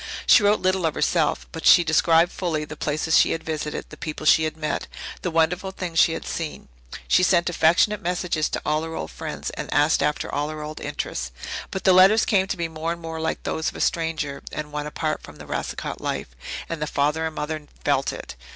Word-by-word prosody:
She - - +7
wrote 205 +1 +3
little 185 -2 +2
of 155 - -3
herself, 155 0 +1
but 160 - -7
she 175 - +7
described 165 +1 +4
fully 160 -5 -2
the 150 - -8
places 155 +2 0
she - - +4
had 165 - -4
visited, 150 -1 -4
the - - -11
people 155 -1 -6
she 160 +1 +6
had 155 0 -4
met, 155 -1 -2 0.3
the 180 - -1
wonderful 165 +3 +1
things 180 -3 -3
she 160 - +5
had - - -5
seen. 155 - -5 0.4
She - - +4
sent 175 -1 +3
affectionate 175 +6 +3
messages 175 -3 -1
to - - -3
all 150 0 +1
her 160 0 -5
old - - -5
friends - - -5
and - - -6
asked 145 +3 +3
after 150 - -1
all 145 +1 -1
her 155 -1 -6
old 155 +1 -7
interests. 65 - -4 0.4
But 190 - -5
the 190 - +6
letters 190 +4 +6
came 190 -2 +2
to 190 - -3
be 170 -1 -1
more 160 +1 -3
and 170 - -4
more 165 -1 -6
like 160 - -2
those 160 - -1
of - - -13
a - - -7
stranger 160 -4 -1
and 150 0 -5
one 150 0 -3
apart 155 +1 -2
from - - -12
the - - -11
Racicot - - -4
life, - - -3 0.4
and 165 -2 -5
the 150 - -1
father 150 +3 0
and 160 - -7
mother 150 0 -4 0.2
felt 135 -1 +2
it. - - -8
160 Hz, 225 wpm, -24 LUFS, 150-175 Hz, 0.4 s, She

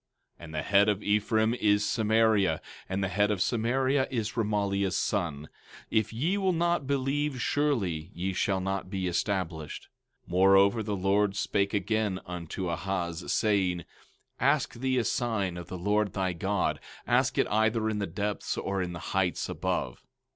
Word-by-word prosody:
17:9 - - -14
And 80 - -11
the 75 - 0
head 100 +1 +4
of 105 -1 -1
Ephraim 110 +2 +2
is 105 -3 +2
Samaria, 110 -6 +2 0.3
and 95 +1 -1
the - - +1
head 100 +2 +1
of 105 -3 0
Samaria 130 +6 +1
is 115 -5 -2
Remaliah's 100 -3 0
son. 80 -7 -1 0.4
If 110 -2 +1
ye 160 - 0
will 190 -2 +2
not 170 -4 +1
believe 140 0 0
surely 105 - 0
ye 95 +2 -2
shall 95 +1 0
not 95 0 -3
be 95 -2 -2
established. 90 -4 -2 0.4
17:10 - - -13
Moreover, 95 +4 +5
the 105 -1 -2
Lord 100 +1 +1
spake 100 0 0
again 105 -1 0
unto 90 0 -5
Ahaz, 85 0 -3
saying: 95 -5 +1
17:11 - - -13 0.6
Ask 140 +2 +2
thee 130 +2 -1
a 120 - +2
sign 110 -8 -1
of 85 -1 -7
the 90 - -6
Lord 105 +2 +1
thy 95 -2 -1
God; 95 +3 -1 0.3
ask - - +2
it - - +4
either 110 +1 +2
in 110 -1 -1
the 100 - -1
depths, 105 0 -3
or 95 -1 -2
in 90 -1 -3
the - - -5 0.2
heights 90 -4 0
above. 60 - -2
100 Hz, 170 wpm, -28 LUFS, 95-110 Hz, 0.6 s, Moreover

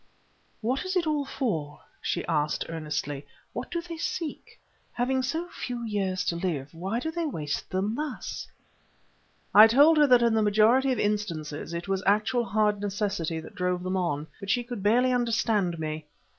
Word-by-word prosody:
"What 255 +7 0
is 375 0 -3
it 355 -2 +2
all 300 -2 0
for?" 165 - -3 0.2
she 175 - -2
asked 150 -2 0
earnestly. 150 -3 -3 0.3
"What - - -5
do 340 - -2
they 335 -1 -7
seek? 320 -1 -4 0.3
Having 260 +2 +1
so 320 +7 -2
few 245 -6 -5
years 190 -4 -1
to 170 - 0
live, 160 -5 -3
why 190 +8 -2
do 320 +6 -3
they 335 0 -2
waste 150 - -3
them 195 +3 -1
thus?" 295 +2 -4 1.1
I 215 +2 +10
told 290 +7 +6
her 295 - +6
that 250 -2 +6
in 235 -1 +3
the 220 - +3
majority 220 +6 +4
of 255 - 0
instances 170 -9 -2
it 170 +2 -4
was 195 -1 0
actual 215 +4 +2
hard 210 -2 +1
necessity 195 -5 -2
that - - -12
drove 180 0 -1
them 185 +1 -1
on, 155 -5 -1
but 200 - -7
she 245 +3 +2
could 240 -3 -6
barely 245 +5 +3
understand 225 -7 +1
me. 155 -1 -4
210 Hz, 175 wpm, -27 LUFS, 170-250 Hz, 1.1 s, I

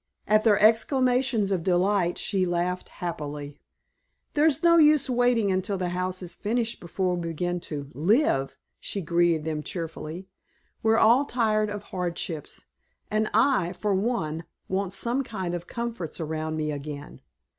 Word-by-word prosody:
At 215 0 +4
their 210 -3 +5
exclamations 245 0 +3
of 185 -3 +1
delight 180 0 +2
she 195 -3 0
laughed 175 +1 -1
happily. 150 -4 -6 0.7
"There's 310 +2 +2
no 335 0 +6
use 300 -4 +5
waiting 245 -4 +2
until 190 +1 -1
the 180 -1 -2
house 185 +1 -2
is 175 - -6
finished 230 +2 -2
before 180 +1 -1
we 175 -1 -3
begin 175 +2 -2
to 145 -2 -5
live," 155 - +2 0.2
she 200 - -4
greeted 170 -1 +2
them 155 -1 -2
cheerily; 165 +2 -6 0.5
"we're 225 0 +3
all 235 +6 +5
tired 215 -4 +1
of 205 0 -5
hardships, 175 -5 -5 0.5
and 215 0 +1
I, 215 -6 +3
for 205 +2 -1
one, 170 -7 -1 0.2
want 195 0 -2
some 240 +6 0
kind 190 -7 -4
of 175 0 -5
comforts 235 -10 -5
around 155 0 -3
me 155 -1 -1
again. 145 0 -7
185 Hz, 145 wpm, -26 LUFS, 170-225 Hz, 0.7 s, no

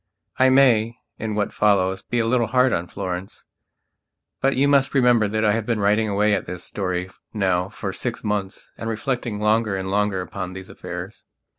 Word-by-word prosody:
(I 130 0 +6
may, 120 -4 +4 0.2
in 110 -1 -3
what 105 -1 -1
follows, 95 -2 +2
be 120 - -3
a 115 - +2
little 115 0 +2
hard 125 +2 +3
on 85 +1 -1
Florence; 90 +1 -6 1.0
but 135 +1 +2
you 135 +2 +3
must 140 -1 +3
remember 120 -5 +4
that 110 +2 0
I 105 - +4
have 110 -1 -2
been 115 -3 0
writing 105 +2 +2
away 105 +1 +2
at - - -1
this 90 -1 -6
story 90 -2 -3 0.2
now 95 -2 +1
for 100 -2 -5
six 120 +5 -4
months 105 -2 -3
and 115 - -3
reflecting 115 -1 -2
longer 105 -1 +2
and 95 0 -4
longer 105 -2 +1
upon 95 0 -6
these 95 0 -9
affairs.) - - -8
105 Hz, 185 wpm, -23 LUFS, 95-115 Hz, 1.0 s, I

